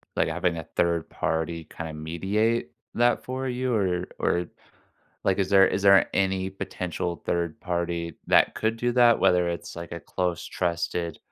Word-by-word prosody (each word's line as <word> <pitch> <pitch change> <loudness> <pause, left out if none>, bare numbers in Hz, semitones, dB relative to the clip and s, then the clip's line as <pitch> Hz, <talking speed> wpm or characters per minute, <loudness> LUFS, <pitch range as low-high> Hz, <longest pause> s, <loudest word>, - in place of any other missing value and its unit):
like, - - +2
having 85 -2 0
a 80 - -4
third 85 -1 +1
party 80 0 -2
kinda 80 0 -7
mediate 95 +6 -1 0.2
that 120 0 +2
for 130 +1 -3
you, 125 0 -1
or 90 -3 0
or, 90 0 +1 0.8
like, 95 0 +2
is 95 -1 0
there 95 -1 +7
is 95 - -1
there 100 -1 +6
any 95 -1 +1
potential 90 -2 -4
third 85 -2 -1
party 85 -2 -2
that - - +4
could 110 +1 0
do 120 +1 0
that, 120 -1 +5
whether 90 -2 +4
it's, 85 0 -5
like, 85 0 -7
a 85 - -5
close 90 -2 -2
trusted 85 -2 -2
90 Hz, 165 wpm, -26 LUFS, 85-100 Hz, 0.8 s, there